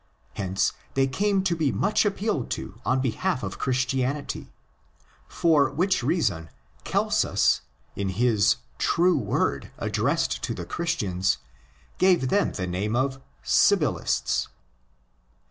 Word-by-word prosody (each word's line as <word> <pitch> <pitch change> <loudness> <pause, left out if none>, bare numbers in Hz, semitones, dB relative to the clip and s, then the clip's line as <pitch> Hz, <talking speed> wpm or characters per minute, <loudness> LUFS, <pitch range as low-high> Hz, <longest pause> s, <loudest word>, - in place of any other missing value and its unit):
Hence 95 -1 0 0.2
they 135 0 +3
came 195 +8 +1
to 180 -3 +1
be 155 -5 +1
much 210 +2 +1
appealed 200 - -1
to 115 - -9
on 130 +1 +1
behalf 130 - -1
of 95 -1 -5
Christianity; 130 +2 -1 0.8
for 155 -4 +3
which 185 +7 +1
reason 120 - 0 0.3
Celsus, - - +2 0.3
in 100 -1 -2
his 110 +1 +3 0.2
True 180 +1 +3
Word 105 - -1
addressed - - 0
to - - -3
the 85 - -6
Christians, 95 - -1 0.6
gave 180 -8 +3
them 205 +6 +2
the 95 - -3
name 95 +5 -2
of 130 +1 -1 0.2
'' - - -34
Sibyllists." 65 +1 +2
130 Hz, 120 wpm, -25 LUFS, -, 0.8 s, they